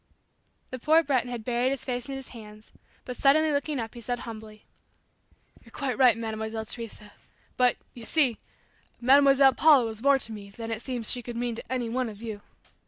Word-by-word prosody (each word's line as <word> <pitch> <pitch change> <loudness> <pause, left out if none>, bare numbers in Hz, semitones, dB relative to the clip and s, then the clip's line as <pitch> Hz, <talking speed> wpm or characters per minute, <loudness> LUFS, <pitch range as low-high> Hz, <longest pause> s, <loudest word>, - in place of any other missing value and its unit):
The 255 - -5
poor 315 +5 +4
Breton 260 -4 0
had 235 -3 -6
buried 245 +1 +1
his 275 -1 -4
face 250 0 -4
in 270 - -4
his 270 -1 -8
hands, 215 -2 -13 0.3
but 250 - -6
suddenly 305 +5 +3
looking 290 0 -1
up, 225 -1 -5
he 240 - -10
said 245 +2 -3
humbly, 220 -2 -10 1.0
"You're - - -17
quite 270 -3 -3
right, 250 -4 +5
Mademoiselle 220 0 -4
Teresa 215 -2 -6 0.4
but, 250 -1 +3 0.2
you 240 - -11
see, 255 -1 +1 0.6
Mademoiselle 275 +1 +6
Paula 290 -3 +5
was 220 -1 -5
more 280 +1 +5
to 230 - -5
me 205 -2 -9
than 225 +3 -7
it 225 -1 -4
seems 245 -3 -2
she 245 - +1
could 240 0 -7
mean 240 0 -2
to 230 - -9
any 250 -2 -1
one 250 +1 -2
of 205 -2 -11
you. 220 -3 -7
245 Hz, 195 wpm, -27 LUFS, 225-270 Hz, 1.0 s, Mademoiselle